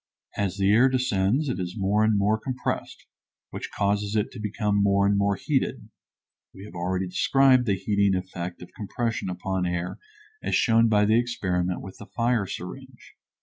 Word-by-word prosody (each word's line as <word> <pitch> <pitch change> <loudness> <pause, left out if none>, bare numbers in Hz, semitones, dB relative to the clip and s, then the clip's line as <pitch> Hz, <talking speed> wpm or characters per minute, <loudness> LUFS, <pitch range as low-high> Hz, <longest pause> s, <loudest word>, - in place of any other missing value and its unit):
As 100 -1 -2
the 100 0 +3
air 125 +5 +5
descends 125 +1 +1
it 125 - -2
is 90 +3 -4
more 105 +2 +2
and 110 -1 +3
more 105 +2 +2
compressed, 130 +2 -4 0.5
which - - -6
causes 100 +1 -1
it 105 -1 0
to 125 - -9
become 105 -1 0
more 100 0 +3
and 100 0 +3
more 100 0 +2
heated. 135 +6 -2 0.7
We 95 +1 -10
have 105 - -12
already 90 +2 -2
described 130 +6 +3
the 100 - +2
heating 100 0 +1
effect 90 -1 -7
of 90 - -14
compression 115 -1 -3
upon 90 0 -2
air 90 0 -3 0.4
as - - -1
shown 115 -1 +4
by 105 -1 +4
the 110 +2 +4
experiment 90 -7 -1
with 95 - -10
the 100 - -10
fire 115 -4 0
syringe. 125 +10 -9
100 Hz, 175 wpm, -25 LUFS, 95-115 Hz, 0.7 s, air